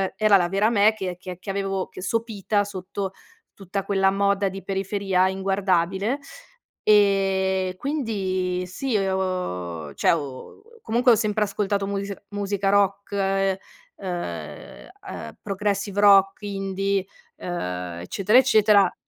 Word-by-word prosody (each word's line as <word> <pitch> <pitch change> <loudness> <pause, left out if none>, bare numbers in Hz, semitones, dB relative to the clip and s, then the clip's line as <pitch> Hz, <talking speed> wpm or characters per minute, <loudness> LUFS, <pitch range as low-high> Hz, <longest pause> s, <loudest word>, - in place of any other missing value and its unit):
era 210 -1 +5
la 175 -2 +1
vera 200 +4 +2
me 215 -1 +4
che 190 -4 -5
che 180 -1 -7
che 195 - -9
avevo 195 -1 -2
sopita 210 0 -1
sotto 195 -1 -5 0.4
tutta 195 0 -4
quella 195 -1 +2
moda 200 0 +1
di 195 +1 -8
periferia 195 -1 0
inguardabile. 190 +4 0 0.6
Ehm, 195 -2 +3
quindi 190 -10 -2
sì 235 +5 -1
ho 180 - -2
cioè - - +3
ho 145 - -4 0.2
comunque 240 +3 +3
ho - - +5
sempre 215 0 0
ascoltato 200 0 -1
musei 200 0 -3
musica 200 -1 -1
rock, 200 0 +2
uhm, 195 -1 +1 1.5
uhm, - - -7
progressive 200 0 -2
rock, 195 -1 +6
indie, 195 -1 -1 0.3
uhm, 90 - -4
eccetera, 195 - +2
eccetera. 215 -6 +4
195 Hz, 115 wpm, -24 LUFS, 185-205 Hz, 1.5 s, rock